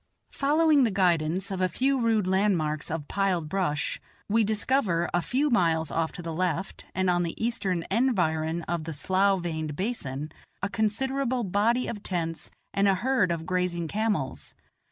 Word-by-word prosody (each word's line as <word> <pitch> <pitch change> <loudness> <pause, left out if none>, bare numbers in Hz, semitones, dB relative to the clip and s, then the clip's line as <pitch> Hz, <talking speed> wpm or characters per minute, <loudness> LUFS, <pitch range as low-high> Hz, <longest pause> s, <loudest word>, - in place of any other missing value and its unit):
Following 295 0 +3
the 235 - +3
guidance 180 -1 +1
of 190 -1 -2
a 185 - +2
few 265 +9 +1
rude 225 -4 +2
landmarks 185 -6 +1
of 150 -2 -4
piled 190 -5 0
brush, 155 -4 -1 0.3
we 225 +2 +3
discover, 210 -5 +1
a 175 - +2
few 270 - 0
miles 165 -8 +2
off 165 -1 0
to 175 - -8
the 165 -1 -4
left, 180 +2 -2
and 185 0 +1
on 175 -1 +3
the 170 -1 -3
eastern 200 -7 -1
environ 170 -8 +1
of 170 -1 -3
the 165 - -4
slough 190 +4 +1
veined 155 -3 -3
basin, 150 - -3 0.3
a 200 - 0
considerable 255 +4 0
body 215 +6 +1
of 210 -3 -5
tents 165 -4 -3 0.2
and 200 0 +3
a 195 - +4
herd 220 -2 +1
of 165 -1 -3
grazing 180 -2 -1
camels. 205 -8 -2
185 Hz, 165 wpm, -27 LUFS, 165-220 Hz, 0.3 s, a